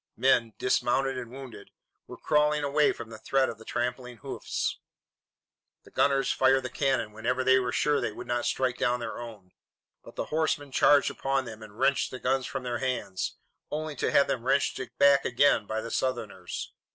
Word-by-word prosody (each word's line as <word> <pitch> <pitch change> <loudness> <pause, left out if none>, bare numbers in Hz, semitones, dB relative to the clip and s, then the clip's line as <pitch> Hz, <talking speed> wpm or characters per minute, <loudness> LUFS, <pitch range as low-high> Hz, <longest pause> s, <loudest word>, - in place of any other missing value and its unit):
Men, 115 -4 +3
dismounted 135 +1 +1
and 125 -2 -6
wounded, 125 -5 -10 0.4
were - - -9
crawling 150 -1 +2
away 145 +1 +3
from 115 -1 -8
the 110 - -9
threat 135 -1 +1
of 110 - -7
the - - -11
trampling 125 0 -3
hoofs. - - -3 1.0
The - - -18
gunners 135 -1 +2
fired 130 0 +3
the 130 - -5
cannon 130 -6 0
whenever 125 +4 -1
they 130 0 +5
were 125 -1 -1
sure 145 +3 +1
they - - -1
would - - -8
not 120 0 -1
strike 130 -2 0
down 125 0 +1
their 115 -1 -5
own, 110 -6 -10 0.5
but - - -13
the - - -3
horsemen 155 -3 0
charged 145 +2 +4
upon 135 -1 -1
them 110 -2 -9
and 105 -1 -12
wrenched 135 +2 +2
the 130 - -7
guns 130 0 0
from 135 -2 -5
their 120 -1 -2
hands, 125 -8 -2 0.3
only 155 0 -4
to - - 0
have 140 - +5
them 130 -4 -2
wrenched 135 +2 +1 0.2
back 140 -1 +5
again 125 -4 +3
by 110 0 -2
the 115 - -7
Southerners. 110 -8 -3
130 Hz, 190 wpm, -28 LUFS, 120-135 Hz, 1.0 s, they